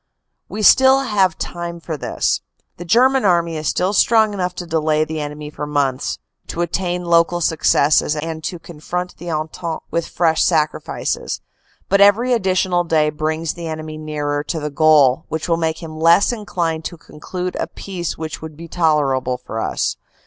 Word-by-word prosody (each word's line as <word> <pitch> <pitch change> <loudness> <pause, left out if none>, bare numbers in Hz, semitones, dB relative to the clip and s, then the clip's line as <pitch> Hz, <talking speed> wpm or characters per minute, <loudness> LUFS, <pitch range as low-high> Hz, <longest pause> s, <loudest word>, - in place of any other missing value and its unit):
We 215 - -4
still 265 +5 +6
have 200 -9 +1
time 170 0 -5
for 165 -1 -5
this. 145 - -1 0.4
The 175 - -8
German 255 +8 +4
army 170 -4 +2
is 155 -1 -3
still 185 +6 +1
strong 220 0 +4
enough 180 -2 -2
to 180 - -5
delay 155 -2 +1
the 155 0 -4
enemy 150 0 -6
for 150 0 -5
months, 140 -3 -1 0.3
to 170 - -4
attain 180 0 -2
local 170 0 +3
successes, 155 -2 +2
and 160 +1 -5
to 175 - -3
confront 170 +2 -6
the 175 +1 -7
Entente 160 +1 -4
with 170 - -1
fresh 165 -2 +2
sacri 155 -3 +1
fices. - - -3 0.5
But 200 +1 +3
every 225 +5 +5
additional 185 -4 +1
day 155 -3 +2
brings 155 +1 -2
the 170 -1 -7
enemy 155 -1 -6
nearer 145 -1 -2
to 165 - -3
the 150 0 -4
goal, 150 -1 +4
and 160 -1 -3
will 165 -1 +2
make 160 +1 -2
him 155 -1 -8
less 170 +7 +5
inclined 170 -8 -2
to 170 - -5
conclude 180 +4 -6
a - - -1
peace 180 -4 -5
which 160 0 -6
would 155 -1 -9
be 170 +1 -9
tolerable 145 -7 +1
for 115 -2 -6
us. - - -1
165 Hz, 175 wpm, -19 LUFS, 155-180 Hz, 0.5 s, still